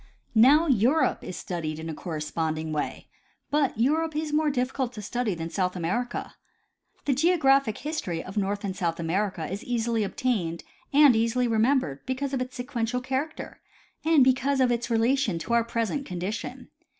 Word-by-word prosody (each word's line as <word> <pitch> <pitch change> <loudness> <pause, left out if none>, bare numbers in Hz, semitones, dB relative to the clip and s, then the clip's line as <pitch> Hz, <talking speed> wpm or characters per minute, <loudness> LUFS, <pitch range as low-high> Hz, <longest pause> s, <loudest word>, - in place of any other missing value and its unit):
Now 270 +8 +6
Europe 265 +2 +2
is 180 - -6
studied 160 -4 -4
in 160 +1 -6
a 160 - -4
corresponding 155 0 -3
way; 150 - -3 0.4
but 285 -5 +1
Europe 315 +6 +1
is 305 -1 -2
more 305 0 +3
difficult 255 -1 -1
to 215 - -7
study 230 -1 -1
than 165 0 -5
South 185 -2 -1
America. 195 +9 -2 0.7
The 280 - +2
geographic 275 - +3
history 240 - -3
of 190 - -9
North 200 0 -1
and 190 -2 -3
South 170 -4 -2
America 180 +1 -1
is 195 +3 -5
easily 230 -2 0
obtained 195 -6 -1 0.3
and 285 -3 +7
easily 230 +2 +1
remembered 225 - +1
because 265 +1 -2
of 260 - 0
its 255 0 -5
sequential 245 -2 -2
character 265 +4 -4 0.4
and 315 -4 +5
because 265 +2 +2
of 255 -2 +4
its 240 0 -1
relation 230 -3 +2
to 165 +8 -3
our 235 0 +4
present 230 +4 -2
condition. 185 +4 -5
235 Hz, 160 wpm, -26 LUFS, 185-270 Hz, 0.7 s, and